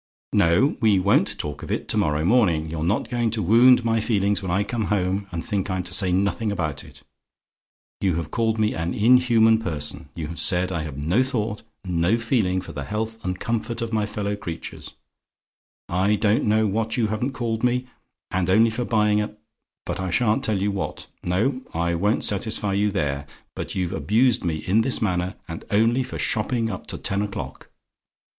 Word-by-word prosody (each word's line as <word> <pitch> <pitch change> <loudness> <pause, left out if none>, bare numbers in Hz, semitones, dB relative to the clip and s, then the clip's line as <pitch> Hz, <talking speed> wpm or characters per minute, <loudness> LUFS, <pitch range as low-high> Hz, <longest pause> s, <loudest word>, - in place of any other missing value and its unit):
"No: 85 - +3
we 110 -4 +4
won't 100 +2 +2
talk 75 -1 -5
of - - -6
it - - -2
to - - 0
morrow 75 +1 +1
morning. 85 -8 +2
You're 80 -1 -3
not 95 +7 0
going 120 -1 0
to 110 -1 -2
wound 120 +5 +6
my 115 0 +2
feelings 105 -3 +1
when 95 - -4
I 95 +4 +1
come 115 0 -2
home, 95 0 0
and 85 -1 -4
think 100 -3 -2
I'm 95 -1 -1
to 90 - -6
say 95 -3 +2
nothing 100 +4 0
about 80 -8 -3
it. - - -16 1.0
You 95 -4 +1
have 85 -2 -4
called 115 -1 0
me 110 -1 +1
an 85 +1 -3
inhuman 115 -1 +5
person; 75 -7 -4
you 80 - -4
have 85 +2 -6
said 90 +1 +1
I 85 -3 -2
have 75 -3 -6
no 85 - +2
thought, 110 -5 -2 0.2
no 90 +4 +1
feeling 110 -6 0
for 95 - -9
the 70 -2 -5
health 110 +3 -4
and 90 0 -3
comfort 115 0 -2
of 115 -1 -4
my 105 -1 +1
fellow 105 -1 -3
creatures; 85 -5 -7 0.9
I 95 +4 +2
don't 105 +1 +2
know 110 +1 +3
what 110 +3 -1
you 115 - +2
haven't 120 +6 -2
called 115 -3 -2
me; 125 +1 +1 0.5
and 95 -1 0
only 110 +4 +5
for 120 +3 -2
buying 105 -2 +2
a 105 0 -5 0.5
but - - -4
I 95 0 -2
sha'n't 110 +7 +1
tell 110 -6 0
you 100 +1 0
what; 100 -1 -4 0.2
no, 115 +10 0
I 85 +1 0
won't 100 +6 +1
satisfy 105 0 0
you 105 +1 +2
there 70 -7 -2 0.3
but - - -5
you've 90 -1 -1
abused 115 +5 +2
me 80 -3 -2
in 105 +5 +3
this 125 +3 +2
manner, 90 -3 -1
and 85 -1 -7
only 115 +5 +3
for 125 - -5
shopping 115 +1 -1
up 95 - -7
to - - -3
ten 100 +1 -1
o'clock. 105 -1 -6
105 Hz, 195 wpm, -23 LUFS, 90-115 Hz, 1.0 s, wound